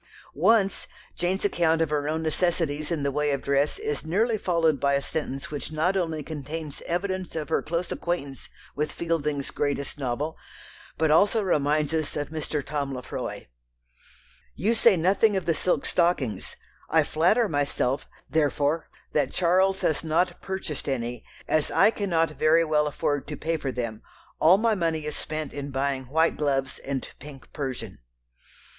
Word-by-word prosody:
Once 195 Hz, +4 st, +3 dB, 0.3 s
Jane's 185 Hz, +3 st, 0 dB
account 165 Hz, -4 st, +2 dB
of 160 Hz, -2 st, +1 dB
her 145 Hz, 0 st, 0 dB
own 160 Hz, +1 st, -1 dB
necessities 160 Hz, -2 st, 0 dB
in 165 Hz, -4 st, -1 dB
the 140 Hz, -, +1 dB
way 150 Hz, +1 st, 0 dB
of 140 Hz, -1 st, -1 dB
dress 140 Hz, +1 st, +1 dB
is 440 Hz, +1 st, -3 dB
nearly 215 Hz, +9 st, +1 dB
followed 165 Hz, -7 st, +1 dB
by 140 Hz, +1 st, +2 dB
a -, -, +3 dB
sentence 140 Hz, -2 st, -4 dB
which 145 Hz, +1 st, -5 dB
not 160 Hz, +5 st, +1 dB
only 165 Hz, -5 st, -1 dB
contains 155 Hz, 0 st, -6 dB
evidence 185 Hz, +1 st, -2 dB
of 155 Hz, -3 st, -3 dB
her -, -, +2 dB
close 170 Hz, +3 st, -2 dB
acquaintance 145 Hz, -6 st, -3 dB, 0.3 s
with 150 Hz, +1 st, -1 dB
Fielding's 150 Hz, -4 st, -1 dB
greatest 145 Hz, 0 st, -2 dB
novel, 140 Hz, +4 st, -2 dB, 0.6 s
but 160 Hz, 0 st, +2 dB
also 205 Hz, +7 st, +4 dB
reminds 150 Hz, -3 st, +1 dB
us 155 Hz, -2 st, -1 dB
of 145 Hz, -1 st, -2 dB
Mr. 155 Hz, -2 st, -3 dB
Tom 140 Hz, -1 st, -2 dB
Lefroy. 125 Hz, -, -5 dB, 1.1 s
"You 205 Hz, +10 st, +1 dB
say 225 Hz, -3 st, +5 dB
nothing 195 Hz, +5 st, +3 dB
of 185 Hz, -, -2 dB
the 165 Hz, -, +3 dB
silk 180 Hz, +3 st, 0 dB
stockings; 145 Hz, -, 0 dB, 0.3 s
I -, -, +4 dB
flatter 185 Hz, +9 st, +3 dB
myself, 145 Hz, -4 st, 0 dB, 0.2 s
therefore, 150 Hz, 0 st, +1 dB, 0.2 s
that 145 Hz, -3 st, +1 dB
Charles 190 Hz, +2 st, +2 dB
has 155 Hz, -, +1 dB
not 175 Hz, +3 st, +1 dB
purchased 190 Hz, -8 st, -4 dB
any, 120 Hz, -2 st, -3 dB, 0.2 s
as 155 Hz, -1 st, +2 dB
I 220 Hz, -, +5 dB
cannot 170 Hz, -7 st, +1 dB
very 165 Hz, +2 st, +5 dB
well 150 Hz, -1 st, +2 dB
afford 145 Hz, -1 st, -1 dB
to 150 Hz, -1 st, -5 dB
pay 165 Hz, +3 st, -1 dB
for 140 Hz, -4 st, -3 dB
them; 115 Hz, -3 st, -4 dB, 0.4 s
all 170 Hz, +5 st, +7 dB
my 225 Hz, +1 st, +2 dB
money 165 Hz, -5 st, -1 dB
is 150 Hz, -, -4 dB
spent 155 Hz, -1 st, -4 dB
in 145 Hz, 0 st, -5 dB
buying 135 Hz, -1 st, -1 dB
white 160 Hz, +6 st, +2 dB
gloves 135 Hz, -3 st, 0 dB
and 135 Hz, -1 st, -4 dB
pink 135 Hz, -3 st, -12 dB
persian.... 130 Hz, -8 st, -5 dB
155 Hz, 165 wpm, -26 LUFS, 140-175 Hz, 1.1 s, all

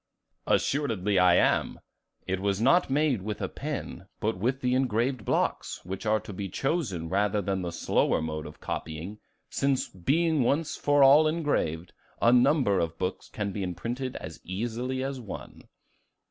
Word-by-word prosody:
"Assuredly 105 Hz, -9 st, +1 dB
I 90 Hz, -1 st, +6 dB
am; -, -, +2 dB, 0.5 s
it 95 Hz, 0 st, -1 dB
was 100 Hz, 0 st, 0 dB
not 135 Hz, +10 st, +4 dB
made 140 Hz, -5 st, +2 dB
with 105 Hz, +2 st, -4 dB
a -, -, -2 dB
pen, 135 Hz, -, -6 dB
but 110 Hz, 0 st, 0 dB
with 125 Hz, +8 st, -1 dB
the 125 Hz, 0 st, +1 dB
engraved 125 Hz, -1 st, +1 dB
blocks, -, -, -1 dB
which 95 Hz, +4 st, -5 dB
are 110 Hz, 0 st, +3 dB
to 105 Hz, -, -9 dB
be 95 Hz, +1 st, -5 dB
chosen 115 Hz, -, -1 dB
rather 100 Hz, +3 st, +1 dB
than 95 Hz, -1 st, -1 dB
the 90 Hz, -, -3 dB
slower 85 Hz, -, +1 dB
mode 80 Hz, -1 st, -4 dB
of -, -, -12 dB
copying, 80 Hz, +7 st, -5 dB, 0.3 s
since 140 Hz, -2 st, +1 dB
being 155 Hz, -, +1 dB
once 150 Hz, +5 st, +1 dB
for 145 Hz, -1 st, +3 dB
all 145 Hz, +3 st, +7 dB
engraved, 145 Hz, -, -1 dB, 0.3 s
a 120 Hz, -, +5 dB
number 125 Hz, -5 st, +4 dB
of 85 Hz, 0 st, -2 dB
books 90 Hz, +1 st, -3 dB
can 105 Hz, -2 st, -3 dB
be 100 Hz, -, -4 dB
imprinted 120 Hz, +8 st, -4 dB
as -, -, -7 dB
easily 120 Hz, +7 st, -3 dB
as 135 Hz, -1 st, -3 dB
one." 110 Hz, -, -9 dB
110 Hz, 160 wpm, -28 LUFS, 95-135 Hz, 0.5 s, all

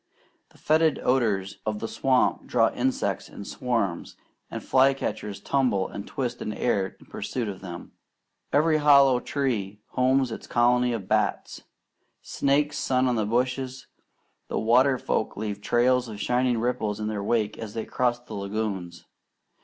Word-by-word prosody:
The -, -, -22 dB
fetid 155 Hz, 0 st, +2 dB
odours 105 Hz, -7 st, +1 dB
of 110 Hz, -1 st, -2 dB
the 115 Hz, -, -4 dB
swamp 130 Hz, +1 st, +1 dB
draw 115 Hz, -2 st, +2 dB
insects 130 Hz, +1 st, -1 dB
in 100 Hz, -, -9 dB
swarms, 115 Hz, -8 st, -2 dB, 0.3 s
and -, -, -6 dB
fly 135 Hz, +1 st, +4 dB
catchers 105 Hz, -6 st, -4 dB
tumble 125 Hz, -9 st, +1 dB
and 100 Hz, -, -7 dB
twist 125 Hz, -3 st, -3 dB
in 105 Hz, -, -3 dB
air 100 Hz, -6 st, -1 dB
in -, -, -17 dB
pursuit 120 Hz, -4 st, -4 dB
of 95 Hz, -2 st, -6 dB
them. 85 Hz, -2 st, -8 dB, 0.6 s
Every 155 Hz, +2 st, +3 dB
hollow 140 Hz, -4 st, +6 dB
tree 110 Hz, -9 st, -2 dB
homes 130 Hz, 0 st, +2 dB
its -, -, -7 dB
colony 125 Hz, +1 st, +3 dB
of 100 Hz, -5 st, -5 dB
bats. -, -, 0 dB, 0.6 s
Snakes 145 Hz, +1 st, 0 dB
sun 130 Hz, -2 st, +1 dB
on 125 Hz, -, +1 dB
the 110 Hz, -2 st, 0 dB
bushes. 130 Hz, +2 st, -1 dB, 0.6 s
The -, -, -3 dB
water 125 Hz, +4 st, +4 dB
folk 110 Hz, -, -2 dB
leave 105 Hz, -1 st, -4 dB
trails 125 Hz, +2 st, +2 dB
of 105 Hz, -2 st, -8 dB
shining 125 Hz, +1 st, +1 dB
ripples 110 Hz, -3 st, -1 dB
in 105 Hz, -, -2 dB
their 105 Hz, -2 st, -3 dB
wake 110 Hz, -1 st, 0 dB
as 110 Hz, -1 st, -7 dB
they 115 Hz, -, -3 dB
cross 120 Hz, -1 st, 0 dB
the 125 Hz, -, -12 dB
lagoons. 100 Hz, -4 st, -4 dB
120 Hz, 155 wpm, -26 LUFS, 105-130 Hz, 0.6 s, hollow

